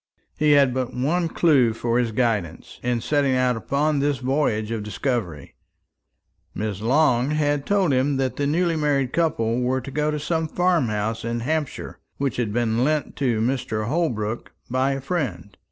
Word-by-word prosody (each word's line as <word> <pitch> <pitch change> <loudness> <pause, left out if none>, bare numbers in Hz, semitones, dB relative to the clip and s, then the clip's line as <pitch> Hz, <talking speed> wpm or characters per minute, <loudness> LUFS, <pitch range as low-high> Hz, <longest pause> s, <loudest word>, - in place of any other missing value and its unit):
He 150 -1 +3
had 140 -3 +4
but 130 -1 -3
one 165 +7 +1
clue 140 -9 +3
for 120 +1 0
his 120 -2 0
guidance 105 -8 -2
in 120 -1 -1
setting 140 0 +1
out 125 -1 +2
upon 140 +6 0
this 145 0 +1
voyage 125 -5 0
of 115 -2 -2
discovery. 105 - -3 1.0
Miss 105 -2 -3
Long 130 +1 +3
had 145 -2 0
told 195 -7 +2
him 135 +2 +1
that 130 -2 -1
the 140 0 -1
newly 170 +3 +1
married 140 -4 0
couple 125 -8 +1
were 130 +1 +1
to 130 +2 -8
go 150 +2 0
to 150 0 -2
some 160 +2 -1
farm 175 -4 +1
house 110 +2 -2
in 115 0 -2
Hampshire 155 +3 -3 0.2
which 135 -4 -2
had 115 -4 -1
been 115 +1 +1
lent 150 +1 0
to 120 -6 +1
Mr. 115 -3 -1
Holbrook 120 -9 -2 0.2
by 130 +2 +1
a 135 - -4
friend. 125 - -3
130 Hz, 170 wpm, -23 LUFS, 115-150 Hz, 1.0 s, had